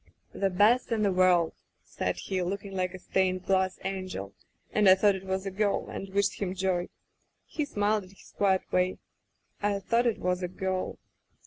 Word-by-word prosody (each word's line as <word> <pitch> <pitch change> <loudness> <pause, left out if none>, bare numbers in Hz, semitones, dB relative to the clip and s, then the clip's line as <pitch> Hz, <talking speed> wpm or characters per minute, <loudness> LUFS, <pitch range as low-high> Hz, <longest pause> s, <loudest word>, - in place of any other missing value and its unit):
* - - -40
"'The 195 - 0
best 215 +7 +3
in 220 -2 +1
the 200 - +3
world!* 180 -3 +4 0.3
said - - -2
he, 190 -2 -2
look 195 +3 -3
ing 200 - -7
like 185 0 -1
a - - -6
stained 185 0 0
glass 190 -1 +1
angel, 185 - -4 0.4
and 210 -2 +5
I 185 - +9
thought 200 +1 +4
it 190 0 -7
was 190 +1 -2
a 195 - -3
girl 200 +1 0
and 195 - -6
wished 200 +1 0
him 190 -1 -1
joy.... 185 -2 0 0.6
He 300 - -3
smiled 210 -5 0
in - - -16
his 195 - -18
quiet 190 -2 +2
way.... 185 0 +1 0.6
I 205 -1 +1
thought 230 +5 +1
it 230 - +1
was 180 0 -1
a 180 - -1
girl! 185 +1 -3
190 Hz, 200 wpm, -29 LUFS, 185-205 Hz, 0.6 s, I